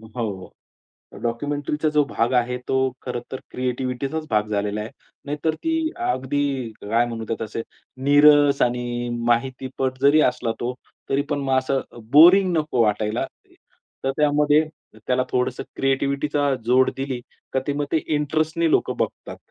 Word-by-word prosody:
हो, 115 -3 -1
हो, 95 - -12 0.7
डॉक्युमेंटरीचा 145 +5 -1
जो 150 -1 +4
भाग 120 +3 0
आहे, 125 0 +1
तो 130 -1 +1
खरंतर 125 +1 -5
क्रिएटिव्हिटीचाच 130 +4 -3
भाग 105 0 +1
झालेला 105 0 -1
आहे. 110 - -5 0.3
नाहीतर 150 +2 -1
ती 325 -1 0 0.2
अगदी 135 - -1
काय 115 +4 +1
म्हणू 115 -1 -5
त्यात 115 - -3
तसे 110 +1 -4 0.4
नीरस 145 0 +6
आणि 120 0 -1 0.2
माहितीपट 130 +2 -1
जरी 145 +2 +6
असला 115 -2 -3
तो, 125 +1 -1 0.4
तरीपण 145 +1 0
मग 135 -1 +1
असं 130 +1 0 0.3
बोरिंग 180 +5 +7
नको 150 -6 +1
वाटायला. 105 0 0 0.8
तर 135 - +2
त्यामध्ये 150 +1 +3 0.4
त्याला 130 0 +2
थोडंसं 125 0 -1
क्रिएटिव्हिटीचा 140 +1 +1
जोड 130 +2 +4
दिली, 135 -2 -3 0.3
तर 130 - +2
ते 145 - 0
मग 145 0 -1
ते 160 - +4 0.2
इंटरेस्टने 155 +3 0
लोकं - - +1
बघतात. - - -3
135 Hz, 140 wpm, -23 LUFS, 120-145 Hz, 0.8 s, बोरिंग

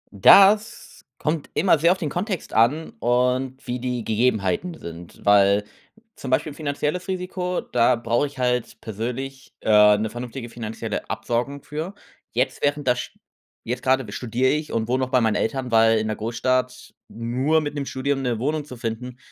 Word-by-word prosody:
Das 200 - +5
kommt 155 -1 -2
immer 165 -3 +4
sehr 170 +2 +4
auf 185 - +1
den 155 - -3
Kontext 190 0 -3
an 130 +9 +2
und 125 +2 0
wie 125 0 -3
die 125 -2 -3
Gegebenheiten 110 - 0
sind, 85 - -10
weil 100 0 +5 0.5
zum 130 - -7
Beispiel 140 +3 0
finanzielles 150 +4 -3
Risiko, 180 -1 -3
da 120 +1 +2
brauche 120 +4 0
ich 140 - -14
halt 125 -1 -1
persönlich, 125 +5 -6
äh, 105 -1 +6
'ne 110 +1 -2
vernünftige 120 +1 -6
finanzielle 115 -1 -5
Absicherung 120 +6 -2
für. 160 +6 -5 0.4
Jetzt, 125 +3 -1
während 145 -1 0
das 125 0 +3
sch - - -7 0.5
jetzt 125 +2 -3
grade 130 +1 +2
b 100 - -9
studiere 125 +3 0
ich 150 +1 -2
und 110 -1 -1
wohne 130 +2 +1
noch 130 - -3
bei 130 - +3
meinen 110 -2 +2
Eltern, 130 +1 -2
weil 115 0 +5
in 110 - -1
'ner 110 - -2
Großstadt 125 +3 -2
nur 130 +7 0
mit 145 -1 -4
'nem 145 -1 -3
Studium 135 +1 -1
'ne 125 -3 -1
Wohnung 150 +5 -2
zu 130 -4 -10
finden, 120 +2 -5
125 Hz, 175 wpm, -23 LUFS, 115-145 Hz, 0.5 s, äh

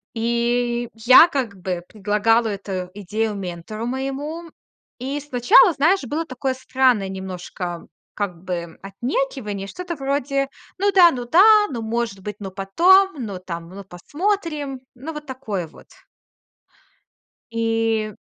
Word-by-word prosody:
И 235 +1 0
я, 250 +9 +7
как 260 -9 -2
бы, 180 -1 -3
предлагала 215 +2 +1
эту 195 -3 -4
идею 210 +2 -2
ментору 195 +4 -6
моему. 275 +6 -4 0.5
И 275 +4 -3
сначала, 295 - +5
знаешь, 325 +6 +2
было 300 +6 -2
такое 260 -1 -2
странное 255 -5 +1
немножко, 180 -2 -6 0.3
как 185 -4 -4
бы, 170 -3 -5
отнекивание, 210 0 -3
что-то 360 - -5
вроде: 275 0 -1 0.3
"Ну 405 +1 +3
да, 355 -3 +8
ну 245 -2 -4
да, 415 - +6
ну, 235 -3 -4
может 225 -3 -2
быть, 210 +1 -6
но 195 - -6
потом, 350 - +4
ну, 200 -4 -5
там, 170 -2 -7
ну, 195 +2 -10
посмотрим". 295 - -3
Ну 275 +6 -7
вот 300 -1 -8
такое 220 -9 -4
вот. - - -17 1.7
И 225 -1 0
235 Hz, 130 wpm, -22 LUFS, 195-280 Hz, 1.7 s, да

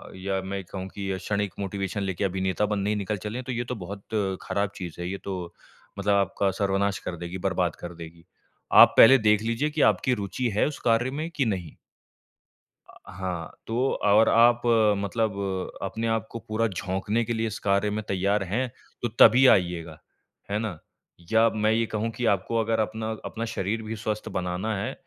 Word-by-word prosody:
या 95 +1 -2
मैं 95 +1 -5
कहूँ 95 +1 -6
कि 100 -1 -4
क्षणिक 100 0 -2
मोटिवेशन 100 0 -3
लेके 95 0 -2
अभिनेता 95 +1 0
बनने 100 0 -1
ही 105 - +1
निकल 105 +1 -2
चले 110 +3 -4
हैं, 130 - -4
तो 130 - -4
ये 120 0 -2
तो - - -1
बहुत 100 +2 -8 0.4
ख़राब 100 +1 -1
चीज़ 90 -2 -7
है। 90 - -3
ये 100 - -3
तो 90 -3 -5 0.5
मतलब 100 +1 +2
आपका 100 0 +1
सर्वनाश 100 0 +1
कर 85 - -3
देगी, 85 +2 -6
बर्बाद 90 -2 0
कर 85 0 -6
देगी। 85 0 -11 0.6
आप - - +4
पहले 135 +4 +9
देख 105 0 +4
लीजिए 115 +6 0
कि 150 0 -2
आपकी 130 - -1
रूचि 110 +6 -2
है 105 - +3
उस 150 - -5
कार्य 120 +2 +2
में, 155 +4 -4
कि 145 -5 0
नहीं? 90 -8 -3 1.1
अ, - - -17 0.2
हाँ, 90 -3 -4 0.2
तो 125 +4 0
और 105 +2 +5
आप 120 +1 +5 0.4
मतलब 105 +1 -1 0.5
अपने 110 +4 -3
आपको 115 0 -2
पूरा 110 +1 +1
झोंकने 100 +3 -2
के 120 - -2
लिए 115 0 -1
इस 105 - -5
कार्य 100 +1 +1
में 105 +1 -3
तैयार 100 +2 +1
हैं, 115 +8 -1 0.3
तो 120 - 0
तभी 125 +4 +8
आइएगा। 85 -3 -5 0.5
है 105 - 0
ना? 105 -8 -4 0.5
या 115 +1 +5
मैं 110 0 +1
ये 115 +1 +2
कहूँ 110 +1 -2
कि 120 +1 -4
आपको 100 +4 -2
अगर 110 0 0
अपना 110 +1 -2 0.2
अपना 115 - -4
शरीर 105 +3 -2
भी 110 +1 -5
स्वस्थ 110 0 -4
बनाना 90 +4 -2
है, 120 +7 -3
100 Hz, 190 wpm, -26 LUFS, 95-115 Hz, 1.1 s, पहले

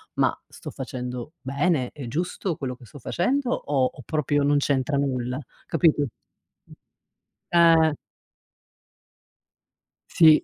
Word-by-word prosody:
"Ma - - +2
sto - - -10
facendo 125 +4 -6
bene, 140 +1 0
è 140 -4 -7
giusto 170 - -2
quello 130 -3 -4
che 125 - -18
sto 130 +5 -12
facendo, 250 - 0
o 135 - +1
o 135 - -11
proprio 145 0 0
non 145 0 +3
c'entra 140 0 +1
nulla?" 130 -2 -1 0.3
Capito, 160 -2 +3
mh, 140 - -7 1.2
eh! 165 -2 +6 2.2
Sì. 160 -2 +6
145 Hz, 115 wpm, -25 LUFS, 130-160 Hz, 2.2 s, eh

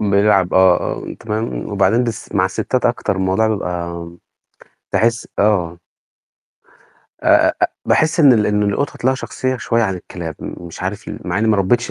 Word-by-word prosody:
بيلعب 100 -2 +2
آه، 95 -1 +6 0.3
آه، - - -6
تمام 105 - -4
وبعدين 120 +2 +2
بس 115 -2 -5
مع 95 - +3
الستات 100 +6 -1
أكتر 120 -5 -1
الموضوع 95 +4 +1
بيبقى 85 -4 -4 0.8
باحس 115 +1 +1
آه. 90 -5 +1 1.4
آآ - - -1 0.2
آآ - - +2
آآ - - +6 0.2
باحس 160 +2 +2
إن 140 -4 +7
ال 105 -3 +3
إن 105 0 +1
القطط 105 +6 -2
ليها 130 - +3
شخصية 130 0 -3
شوية 115 -1 0
عن 95 -3 0
الكلاب 85 -2 -7
م 90 - -7
مش 85 - -9
عارف 95 +3 -4
ليه - - -6
مع - - -1
إني 110 +1 +1
ما 105 - +3
ربيتش 115 +5 +1
105 Hz, 170 wpm, -18 LUFS, 95-115 Hz, 1.4 s, إن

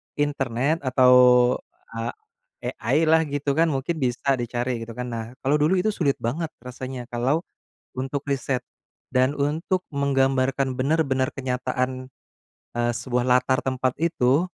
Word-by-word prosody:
internet, 145 +1 0
atau 130 -1 +4 0.8
a 115 0 -4 0.5
AI 160 - 0
lah, 160 +1 +5
gitu 145 0 -1
kan? 165 +3 +3
Mungkin 150 +3 -2
bisa 130 +2 +1
dicari, 120 0 -2
gitu 115 - -9
kan. 125 - -3
Nah, 115 -1 -3 0.2
kalau 145 +2 +3
dulu 155 +6 +3
itu 205 +4 +2
sulit 145 -8 +1
banget 150 +9 -2 0.2
rasanya 125 0 -6
kalau 130 +8 0 0.5
untuk 135 +2 -2
riset 135 -1 0 0.6
dan 130 +2 +4
untuk 160 +6 -1
menggambarkan 135 -1 +1
benar-benar 135 -2 +1
kenyataan, 130 0 -2 0.7
eee, 120 0 +1
sebuah 125 0 -1
latar 130 +1 +3
tempat 130 -1 0
itu 160 -1 +2
130 Hz, 130 wpm, -24 LUFS, 125-145 Hz, 0.8 s, lah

